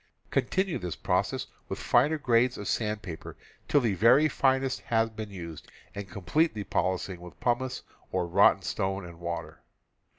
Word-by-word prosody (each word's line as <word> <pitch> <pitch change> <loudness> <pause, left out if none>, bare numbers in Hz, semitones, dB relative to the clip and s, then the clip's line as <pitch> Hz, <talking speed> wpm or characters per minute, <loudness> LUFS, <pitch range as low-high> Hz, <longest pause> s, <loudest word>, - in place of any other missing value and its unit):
Continue 190 -2 0
this 90 -3 -4
process - - 0 0.2
with - - -3
finer 145 +6 +3
grades 125 -3 +2
of 105 - -6
sandpaper 105 -7 -3 0.3
till 145 - +4
the 115 -5 +1
very 125 - +5
finest 135 -2 +1
has 115 -1 +1
been 110 -1 -6
used 85 -5 -8 0.2
and 100 -1 -6
complete 150 - +1
the 105 - -3
polishing 95 -2 -1
with 90 -4 -12
pumice 125 +1 -1 0.3
or 90 -1 0
rotten 85 - +4
stone 95 0 -2
and 85 -1 -11
water. 85 0 -5
110 Hz, 155 wpm, -28 LUFS, 90-130 Hz, 0.3 s, very